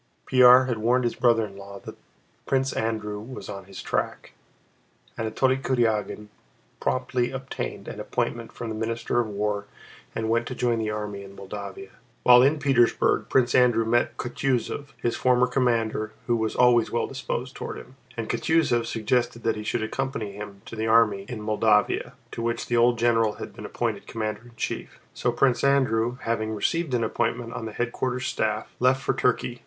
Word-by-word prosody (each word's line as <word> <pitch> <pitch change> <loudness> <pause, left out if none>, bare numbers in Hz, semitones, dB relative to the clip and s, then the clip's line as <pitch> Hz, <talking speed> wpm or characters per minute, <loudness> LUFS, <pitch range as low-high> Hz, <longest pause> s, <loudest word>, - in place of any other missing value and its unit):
Pierre 125 0 +7
had 120 -3 -2
warned 125 +3 +2
his 120 - 0
brother 115 -3 +3
in 100 -2 -11
law 100 0 -9
that - - -8 0.5
Prince 135 0 +1
Andrew 110 -2 -2
was 125 +5 -8
on 100 -1 -7
his 95 0 -9
track. - - -3 0.8
Anatole 130 +4 +1
Kurágin 115 -6 0 0.5
promptly 125 -1 0
obtained 135 0 -5
an - - -7
appointment - - -2
from 115 - -6
the - - -3
Minister 115 +2 -1
of 120 - +1
War 105 0 -2 0.5
and 110 - -1
went 115 +1 +1
to 125 - -5
join 120 -2 +1
the 110 -1 -1
army 105 -2 -4
in 100 0 -12
Moldavia. 100 -1 -8 0.3
While 125 0 +8
in 140 +4 +4
Petersburg 135 -5 +2
Prince 125 -2 +3
Andrew 120 -3 +4
met 120 +2 +1
Kutúzov, 130 +2 -2
his 120 - -1
former 125 0 +3
commander 115 -4 0
who 120 - +2
was 110 -1 -1
always 120 -2 +4
well 120 - 0
disposed 130 -1 -4
toward - - -5
him, 130 - -12 0.2
and 115 - -3
Kutúzov 120 -1 +1
suggested 115 +1 0
that 115 - +1
he 105 - -5
should 110 +1 -1
accompany 115 -2 -3
him 100 0 -9
to - - -8
the 110 0 -2
army 110 -3 +3
in 115 -4 -5
Moldavia, 105 -1 +2 0.2
to - - -5
which 115 0 -1
the 120 - -1
old 120 0 +4
general 115 -2 +3
had - - -8
been - - -7
appointed - - -3
commander 110 +1 -4
in 120 - -15
chief. - - -4
So 120 - 0
Prince 120 0 +2
Andrew, 125 -4 +2
having 110 -1 -1
received 155 +6 0
an 115 - +1
appointment 115 +1 -1
on 115 - -5
the - - -6
headquarters 125 +2 -2
staff, 110 -3 -2
left 130 +1 +3
for - - +1
Turkey. 120 -1 0
115 Hz, 180 wpm, -25 LUFS, 110-125 Hz, 0.8 s, While